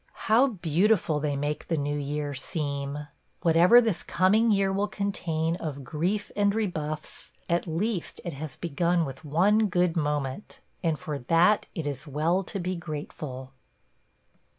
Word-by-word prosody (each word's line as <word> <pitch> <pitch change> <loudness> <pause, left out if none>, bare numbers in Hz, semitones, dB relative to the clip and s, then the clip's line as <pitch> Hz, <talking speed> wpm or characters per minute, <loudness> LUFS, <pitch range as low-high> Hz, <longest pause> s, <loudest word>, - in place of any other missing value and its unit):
How 235 +5 +5
beautiful 180 - +1
they 145 -1 -1
make 145 +2 -3
the 165 - 0
new 145 0 -1
year 145 0 -3
seem! 140 0 -3 0.2
– - - -43
Whatever 170 +7 +7
this 225 -7 0
coming 205 +7 +3
year 195 -2 +2
will 200 +2 0
contain 170 -5 -1
of 145 -5 -5
grief 175 +10 -2
and 205 0 +2
rebuffs, 155 -8 -4 0.2
at 170 +1 0
least 180 +3 -2
it 175 - -3
has 145 +2 -6
begun 170 +1 0
with 135 -1 -8
one 195 +9 +3
good 180 -2 +1
moment, 150 +1 -2 0.2
and 165 -3 0
for 145 0 -5
that 170 +10 +3
it 165 -5 -3
is 145 +1 -4
well 160 +6 +1
to 200 - -4
be 180 +1 -2
grateful. 145 -5 -6
165 Hz, 150 wpm, -27 LUFS, 145-195 Hz, 0.2 s, Whatever